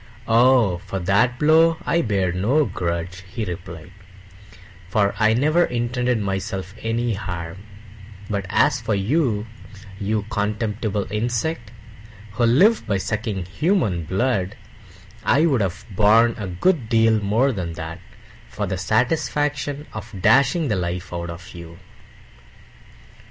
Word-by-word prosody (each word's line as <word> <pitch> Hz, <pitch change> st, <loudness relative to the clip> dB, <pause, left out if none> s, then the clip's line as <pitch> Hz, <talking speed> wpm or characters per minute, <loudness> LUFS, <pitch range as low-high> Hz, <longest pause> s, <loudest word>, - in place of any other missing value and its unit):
"Oh, 115 Hz, -5 st, +4 dB
for 95 Hz, +1 st, -6 dB
that 100 Hz, +7 st, +2 dB
blow 160 Hz, +3 st, +4 dB
I 170 Hz, 0 st, +2 dB
bear 100 Hz, -, 0 dB
no 120 Hz, -, +2 dB
grudge," 85 Hz, -1 st, -4 dB
he 115 Hz, -3 st, -3 dB
replied, 85 Hz, -2 st, -8 dB, 1.0 s
"for 100 Hz, -1 st, +2 dB
I 110 Hz, 0 st, +4 dB
never 155 Hz, +7 st, +3 dB
intended 125 Hz, 0 st, -1 dB
myself 95 Hz, -2 st, -3 dB
any 115 Hz, +1 st, -1 dB
harm; 90 Hz, -3 st, -5 dB, 0.7 s
but 100 Hz, -2 st, -3 dB
as 140 Hz, +2 st, +2 dB
for 110 Hz, -2 st, -1 dB
you, 110 Hz, 0 st, 0 dB, 0.5 s
you 105 Hz, +1 st, -1 dB
contemptible 105 Hz, -1 st, -2 dB
insect, 120 Hz, +3 st, -2 dB, 0.6 s
who 120 Hz, +4 st, +1 dB
live 185 Hz, -, +4 dB
by 100 Hz, -2 st, +1 dB
sucking 105 Hz, -1 st, -3 dB
human 105 Hz, -, 0 dB
blood, 100 Hz, +1 st, -1 dB, 0.7 s
I'd 140 Hz, -5 st, +3 dB
have 95 Hz, -2 st, -3 dB
borne 110 Hz, +4 st, +4 dB
a 105 Hz, -, -5 dB
good 115 Hz, -, 0 dB
deal 115 Hz, -1 st, +3 dB
more 110 Hz, +7 st, +2 dB
than 90 Hz, -7 st, -4 dB
that 80 Hz, +1 st, -7 dB, 0.5 s
for 105 Hz, -, -3 dB
the 95 Hz, -2 st, -3 dB
satisfaction 145 Hz, -, 0 dB
of 110 Hz, -1 st, -8 dB
dashing 140 Hz, -, +3 dB
the 105 Hz, -, +1 dB
life 90 Hz, 0 st, -4 dB
out 85 Hz, 0 st, -4 dB
of 85 Hz, +1 st, -9 dB
you!" 85 Hz, -1 st, -10 dB
105 Hz, 125 wpm, -22 LUFS, 95-125 Hz, 1.0 s, Oh